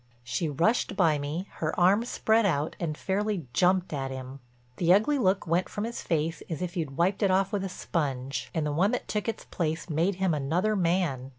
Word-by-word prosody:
She 125 Hz, +6 st, -2 dB
rushed 195 Hz, -, +1 dB
by 160 Hz, -6 st, +3 dB
me, 155 Hz, +7 st, -4 dB
her 155 Hz, +2 st, -2 dB
arms 200 Hz, +7 st, +4 dB
spread 225 Hz, +1 st, +2 dB
out, 155 Hz, -6 st, 0 dB
and 155 Hz, -3 st, -2 dB
fairly 200 Hz, -3 st, -1 dB
jumped 180 Hz, 0 st, +2 dB
at 135 Hz, -2 st, -2 dB
him. 130 Hz, +1 st, -7 dB, 0.4 s
The 175 Hz, -1 st, +3 dB
ugly 220 Hz, +10 st, +4 dB
look 190 Hz, -4 st, +2 dB
went 170 Hz, +2 st, +1 dB
from 205 Hz, -, -4 dB
his 235 Hz, +1 st, -4 dB
face 160 Hz, 0 st, -1 dB
as 160 Hz, -, -3 dB
if 180 Hz, +1 st, -4 dB
you'd 155 Hz, -6 st, -3 dB
wiped 185 Hz, +4 st, +1 dB
it 200 Hz, -, +3 dB
off 190 Hz, +1 st, +2 dB
with 200 Hz, -2 st, 0 dB
a 195 Hz, -, -3 dB
sponge, 140 Hz, -7 st, -3 dB
and 160 Hz, -3 st, -1 dB
the 150 Hz, -, -1 dB
one 175 Hz, +7 st, +2 dB
that 245 Hz, -, -2 dB
took 210 Hz, +1 st, -2 dB
its 225 Hz, -, -5 dB
place 165 Hz, 0 st, -3 dB
made 170 Hz, +6 st, +1 dB
him 190 Hz, -2 st, +1 dB
another 165 Hz, +9 st, 0 dB
man. 170 Hz, -8 st, 0 dB
175 Hz, 210 wpm, -28 LUFS, 150-195 Hz, 0.4 s, arms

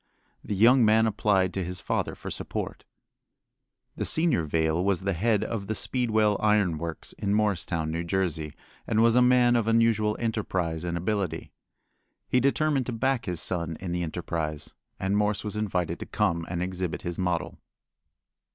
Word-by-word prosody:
The 105 Hz, -, -3 dB
young 120 Hz, +5 st, +6 dB
man 110 Hz, +1 st, +5 dB
applied 100 Hz, -3 st, +1 dB
to 95 Hz, -, -2 dB
his 90 Hz, +1 st, -4 dB
father -, -, -2 dB
for -, -, -7 dB
support. -, -, -5 dB, 1.1 s
The -, -, -2 dB
senior 160 Hz, -, +2 dB
Vail 80 Hz, +2 st, +1 dB
was 95 Hz, -1 st, +1 dB
the 100 Hz, +1 st, -1 dB
head 105 Hz, +4 st, +1 dB
of 105 Hz, -4 st, -4 dB
the 110 Hz, -, -2 dB
Speedwell 110 Hz, -4 st, +1 dB
Iron 105 Hz, -7 st, +2 dB
Works 85 Hz, -1 st, -5 dB
at -, -, -3 dB
Morristown, 95 Hz, -6 st, 0 dB
New 85 Hz, +1 st, -2 dB
Jersey, 85 Hz, -4 st, -2 dB, 0.3 s
and 110 Hz, 0 st, +3 dB
was 115 Hz, 0 st, +5 dB
a 125 Hz, -, +5 dB
man 125 Hz, -1 st, +5 dB
of 115 Hz, -2 st, +1 dB
unusual 115 Hz, -2 st, +2 dB
enterprise 95 Hz, -8 st, -2 dB
and 85 Hz, 0 st, -2 dB
ability. 90 Hz, -2 st, -2 dB, 0.8 s
He 125 Hz, -, +3 dB
determined 140 Hz, 0 st, +1 dB
to -, -, -2 dB
back 130 Hz, +1 st, 0 dB
his 90 Hz, -3 st, -3 dB
son 85 Hz, -3 st, -2 dB
in 90 Hz, -2 st, -5 dB
the 90 Hz, 0 st, -1 dB
enterprise, 80 Hz, -2 st, -4 dB, 0.3 s
and 95 Hz, +1 st, 0 dB
Morse 105 Hz, -1 st, +1 dB
was 105 Hz, 0 st, -4 dB
invited 95 Hz, -5 st, -1 dB
to -, -, -7 dB
come 85 Hz, 0 st, 0 dB
and 85 Hz, 0 st, -2 dB
exhibit 90 Hz, -1 st, -4 dB
his 85 Hz, +1 st, -4 dB
model. 90 Hz, -2 st, -2 dB
100 Hz, 170 wpm, -27 LUFS, 85-110 Hz, 1.1 s, young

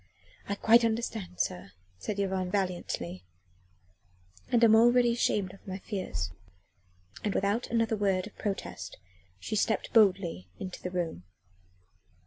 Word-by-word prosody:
"I 200 Hz, -, 0 dB
quite 230 Hz, +3 st, +5 dB
understand, 220 Hz, -5 st, -2 dB
sir," 90 Hz, +1 st, -2 dB, 0.3 s
said 200 Hz, -, -3 dB
Yvonne 190 Hz, -2 st, 0 dB
valiantly, 175 Hz, -, -2 dB, 1.3 s
"and 240 Hz, -1 st, +4 dB
am 225 Hz, -1 st, +7 dB
already 240 Hz, +1 st, +5 dB
ashamed 205 Hz, -5 st, 0 dB
of 195 Hz, -, -17 dB
my 190 Hz, 0 st, -4 dB
fears." 185 Hz, -, -4 dB, 0.9 s
And 205 Hz, -, -1 dB
without 205 Hz, +5 st, +1 dB
another 230 Hz, -1 st, +1 dB
word 195 Hz, -3 st, +1 dB
of 210 Hz, -, -12 dB
protest 200 Hz, -2 st, -4 dB, 0.4 s
she 95 Hz, -, -4 dB
stepped 215 Hz, 0 st, 0 dB
boldly 185 Hz, -, +3 dB
into 185 Hz, -, -7 dB
the 180 Hz, -, -3 dB
room. 170 Hz, -, -3 dB
195 Hz, 125 wpm, -30 LUFS, 180-220 Hz, 1.3 s, am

